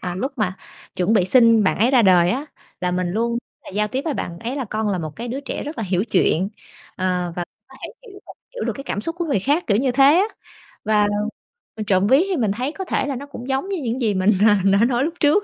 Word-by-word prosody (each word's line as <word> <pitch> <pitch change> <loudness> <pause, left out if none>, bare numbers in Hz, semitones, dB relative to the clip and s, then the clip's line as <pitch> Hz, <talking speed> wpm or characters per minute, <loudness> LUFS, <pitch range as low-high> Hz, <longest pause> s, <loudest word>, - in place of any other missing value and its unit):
à, 180 -1 -4
lúc 260 +10 -3
mà 190 -4 0 0.4
chuẩn 185 +4 +1
bị 205 -5 +4
sinh 230 +1 +5
bạn 185 - +1
ấy 230 +4 +3
ra 255 -3 +5
đời 180 -3 +5
á, 270 +7 -2 0.4
là 180 - 0
mình 180 0 -1
luôn 235 +4 -1 0.3
là - - -9
giao 210 +2 0
tiếp 260 +5 -2
với 315 -4 -1
bạn 170 -7 -5
ấy 240 +8 -4
là 270 - -2
"Con 215 0 -2
là 195 -3 -1
một 155 -3 -6
cái 235 +2 -5
đứa 265 +4 -4
trẻ 280 - -5
rất 300 +2 -7
là 225 - -2
hiểu 185 0 0
chuyện, 190 -4 +1 0.5
ờ, 180 -2 -1
và 175 - -2 0.2
có - - -15
thể - - -4 0.2
hiểu 395 0 -13
được - - -10 0.2
hiểu - - -4
được - - -1
cái 275 - -9
cảm 205 - -3
xúc 330 +9 -3
của 345 - -1
người 285 -9 0
khác", 290 - +1
kiểu 200 - +2
như 255 +3 +1
thế 270 +2 +4
á. 375 - +4 0.6
Và 210 -1 +3 0.7
mình 215 -1 -5
trộm 195 0 +2
vía 270 +8 +5
thì 380 -3 -1
mình 220 -6 +1
thấy 250 +7 -2
có 380 - -6
thể 275 - -1
là 280 - -2
nó 270 +3 -6
cũng 265 -3 -9
giống 270 +8 -1
như 390 - -2
những 245 +2 -2
gì 220 -4 +1
mình, 190 +2 +3 0.2
ờ, 210 - +6 0.2
đã 200 +4 +4
nói 245 +1 +1
lúc 325 +3 -2
trước. 310 +7 +3
230 Hz, 275 wpm, -21 LUFS, 190-275 Hz, 0.7 s, ờ